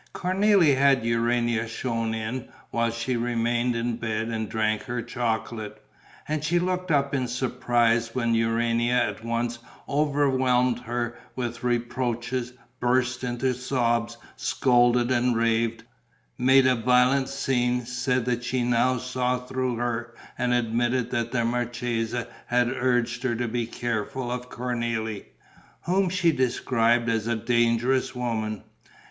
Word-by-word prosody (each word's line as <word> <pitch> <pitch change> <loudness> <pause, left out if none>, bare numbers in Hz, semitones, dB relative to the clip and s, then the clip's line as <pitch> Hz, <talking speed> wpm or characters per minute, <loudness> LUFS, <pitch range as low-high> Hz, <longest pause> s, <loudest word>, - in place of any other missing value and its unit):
Cornélie 185 -4 +3
had 135 -3 +3
Urania 115 0 +1
shown 115 -1 -2
in, 110 +3 -4 0.2
while 115 0 +1
she 115 +2 -2
remained 120 0 0
in 115 0 -1
bed 115 -1 -2
and 110 -2 -3
drank 110 -1 0
her 120 -1 -3
chocolate. 110 -2 -3 0.5
And 150 -1 -2
she 165 +3 +1
looked 185 +1 -1
up 140 -3 +2
in 130 -2 0
surprise 120 -2 +1
when 115 -2 +1
Urania 115 +1 +1
at 115 -3 0
once 115 +1 -2 0.3
overwhelmed 130 -4 +2
her 120 0 -4 0.2
with 120 -2 -4
reproaches, 120 0 -1 0.3
burst 125 0 +1
into 125 +1 0
sobs, 120 -2 0 0.2
scolded 120 -1 +2
and 125 -1 +2
raved, 115 0 +1 0.5
made 130 +1 +5
a 130 - +5
violent 125 +3 +3
scene, 125 -3 0
said 125 0 -1
that 120 -1 -1
she 125 0 -1
now 125 +1 +2
saw 125 0 -1
through 125 0 -2
her 120 0 -3 0.2
and 125 0 0
admitted 120 +1 +1
that 115 -2 -1
the 120 -2 +1
marchesa 120 -1 -2 0.2
had 120 0 +2
urged 125 -1 0
her 125 -2 0
to 120 +1 -2
be 115 0 -2
careful 120 +2 -3
of 125 0 -5
Cornélie, 115 -4 -3 0.6
whom 185 +1 +2
she 180 -2 +2
described 120 -3 +1
as 115 -1 0
a 120 - +1
dangerous 120 +3 +1
woman. 110 -4 -2
120 Hz, 135 wpm, -26 LUFS, 115-125 Hz, 0.6 s, made